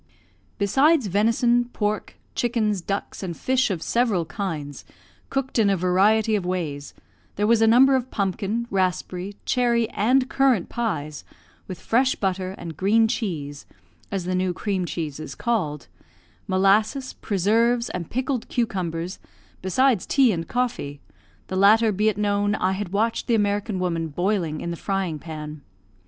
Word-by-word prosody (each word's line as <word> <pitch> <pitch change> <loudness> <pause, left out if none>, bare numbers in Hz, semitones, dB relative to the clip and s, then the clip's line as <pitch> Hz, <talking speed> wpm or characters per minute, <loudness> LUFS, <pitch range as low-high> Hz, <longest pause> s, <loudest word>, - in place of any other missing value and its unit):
Besides 270 +8 +3
venison, 230 +5 +2
pork, 210 -1 -2 0.2
chickens, 220 -5 0
ducks, 200 +3 -4
and 175 -4 -5
fish 260 -1 +1
of 180 -5 -3
several 225 -8 +1
kinds, 155 -5 -5 0.5
cooked 270 -2 -1
in 210 -2 +4
a 195 - +2
variety 205 +5 +3
of 200 - -1
ways, 160 -6 -4 0.4
there 205 - 0
was 225 +1 +4
a 225 - +5
number 260 +4 +6
of 255 -1 -1
pumpkin, 200 +3 -1
raspberry, 185 0 -1
cherry, 235 -2 +2
and 255 +5 +2
currant 260 -8 +2
pies, 155 -11 -3 0.4
with 185 - -7
fresh 255 +3 +2
butter 190 -1 -2
and 165 -2 -7
green 220 +4 +3
cheese 155 - -4 0.4
(as 195 -3 -2
the 185 - -1
new 185 0 0
cream 195 -3 -1
cheese 155 -4 -4
is 155 - -7
called), 180 -12 -1 0.6
molasses, 210 +8 +2
preserves, 230 +5 +1
and 175 -3 -5
pickled 255 0 -2
cucumbers, 185 -7 -2 0.4
besides 230 +3 +2
tea 265 -4 +4
and 165 -3 -3
coffee 235 - -2 0.5
the 185 - -5
latter, 215 +4 +5
be 210 +2 +2
it 205 - -3
known, 205 0 +1
I 185 -3 0
had 190 0 -3
watched 220 +4 0
the 235 - +3
American 205 -1 0
woman 170 -3 -1
boiling 175 -1 -1
in 170 - -3
the 170 - -5
frying 190 -6 -2
pan. 155 -1 -7
200 Hz, 150 wpm, -24 LUFS, 180-230 Hz, 0.6 s, number